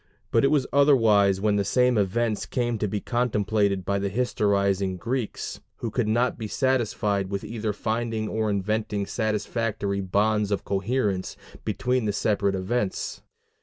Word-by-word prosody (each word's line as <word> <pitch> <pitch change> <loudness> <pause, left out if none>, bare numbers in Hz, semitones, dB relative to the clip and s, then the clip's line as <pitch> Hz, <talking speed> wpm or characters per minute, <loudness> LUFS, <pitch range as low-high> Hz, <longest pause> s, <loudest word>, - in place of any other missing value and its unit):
But 115 - +3
it - - +6
was 145 -3 +2
otherwise 110 -9 +5
when 105 0 +2
the 100 - +2
same 125 +5 +3
events 110 +2 0
came 120 -3 -1
to 105 - 0
be 105 +1 -2
contemplated 105 -5 0
by 100 0 0
the 100 0 -1
historicizing 100 -4 +1
Greeks, 120 +3 -3 0.2
who 115 - -4
could 120 -1 0
not 120 +4 +1
be 110 - -3
satisfied 105 -6 0
without 100 +2 -4
either 110 -2 -2
finding 110 +1 -2
or 110 0 -1
inventing 105 0 -1
satisfactory 105 -2 -1
bonds 105 +2 +1
of 100 - -2
coherence 100 -1 -1 0.3
between 125 +3 0
the 105 - 0
separate 100 -1 +1
events. 95 +2 -2
105 Hz, 150 wpm, -25 LUFS, 100-120 Hz, 0.3 s, it